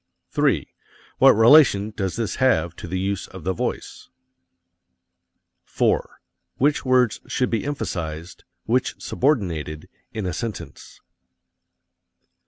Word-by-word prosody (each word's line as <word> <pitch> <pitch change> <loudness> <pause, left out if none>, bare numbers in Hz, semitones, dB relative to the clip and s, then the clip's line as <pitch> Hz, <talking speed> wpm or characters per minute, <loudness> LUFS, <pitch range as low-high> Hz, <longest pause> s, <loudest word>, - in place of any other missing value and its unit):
3. - - +1 0.5
What - - +7
relation 110 -3 +5
does 95 -3 -3
this 115 -3 -3
have 85 - +1
to - - -8
the 90 +2 -3
use 100 +1 -2
of 95 -4 -11
the 95 +3 -1
voice? - - -5 1.5
4. - - -1 0.4
Which 145 +3 +1
words 125 -5 +2
should 125 - -1
be 115 - 0
emphasized, 85 - -5 0.2
which 125 +3 0
subordinated, 85 - -1 0.2
in 110 -3 -4
a 90 - -2
sentence? 110 +2 -7
105 Hz, 110 wpm, -22 LUFS, 90-125 Hz, 1.5 s, What